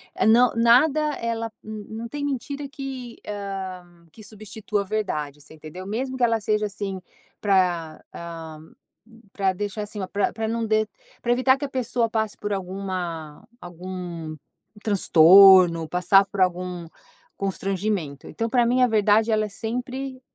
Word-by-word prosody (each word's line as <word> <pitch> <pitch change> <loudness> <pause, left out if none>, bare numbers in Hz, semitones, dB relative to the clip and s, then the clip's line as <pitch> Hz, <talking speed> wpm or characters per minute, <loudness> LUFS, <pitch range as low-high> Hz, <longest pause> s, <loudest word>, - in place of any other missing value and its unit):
é - - +1
não, 240 +3 +5
nada 250 +7 +5 0.2
ela, 230 -1 -3
não 220 +2 -7
tem 290 +3 -4
mentira 280 +1 -4
que 265 -3 -7
ah, 195 -3 -5 0.3
que 215 - -14
substitua 215 0 -4
a - - -3
verdade, 155 -9 -3
você 145 - -14
entendeu? 160 +4 -10
Mesmo 260 +5 -3
que 250 - -1
ela 230 -1 +3
seja 210 0 0
assim, 195 -2 -4 0.4
pra 180 -5 0
hã, 165 -2 -8 0.7
pra 195 -2 +1
deixar 205 +2 -4
assim, 210 0 -7
pra 205 0 0
pra 220 0 -3
não 230 0 -1
de 215 -1 +1 0.3
pra 240 - 0
evitar 260 +2 +3
que 285 - -4
a 275 - -6
pessoa 245 -3 -1
passe 220 -2 -2
por 210 0 -3
alguma 180 -5 -5
algum 175 -2 -7 0.5
transtorno, 185 -3 +7
passar 180 +3 +4
por 195 0 -4
algum 180 -1 -1 0.5
constrangimento, 195 -6 -3
então 230 0 -3
pra 240 0 +3
mim 250 +2 +2
a 250 - +6
verdade 215 0 +3
ela 215 0 +2
é - - -7
sempre, 255 +5 -5
205 Hz, 150 wpm, -24 LUFS, 185-230 Hz, 0.7 s, transtorno